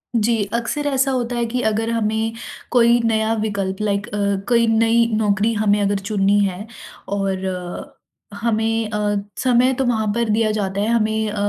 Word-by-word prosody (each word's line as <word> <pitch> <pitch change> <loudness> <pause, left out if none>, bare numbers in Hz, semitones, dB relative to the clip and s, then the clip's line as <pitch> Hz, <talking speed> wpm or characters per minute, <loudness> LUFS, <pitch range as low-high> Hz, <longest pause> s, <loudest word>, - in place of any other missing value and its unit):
जी, 225 -1 +2
अक्सर 265 +5 -2
ऐसा 270 -1 +1
होता 245 -1 -2
है 235 - 0
कि 245 +2 -2
अगर 220 +1 0
हमें 220 0 -1 0.4
कोई 235 -1 +4
नया 220 0 +1
विकल्प 195 -3 -2
लाइक 205 0 -1
अ, 210 -3 -5 0.3
कोई 235 -1 +4
नई 230 +1 +3
नौकरी 210 +1 +1
हमें 210 -1 +2
अगर 200 0 +1
चुननी 200 0 +1
है 190 +1 -4 0.4
और 195 -1 -2 1.0
हमें 225 -1 0
अ, 210 -1 -1 0.2
समय 255 0 +3
तो 265 - +1
वहाँ 220 -3 0
पर 235 -2 0
दिया 215 0 +2
जाता 200 -2 -2
है, 210 - 0
हमें 220 -2 +1
अ, 210 - -5
220 Hz, 165 wpm, -20 LUFS, 205-235 Hz, 1.0 s, कोई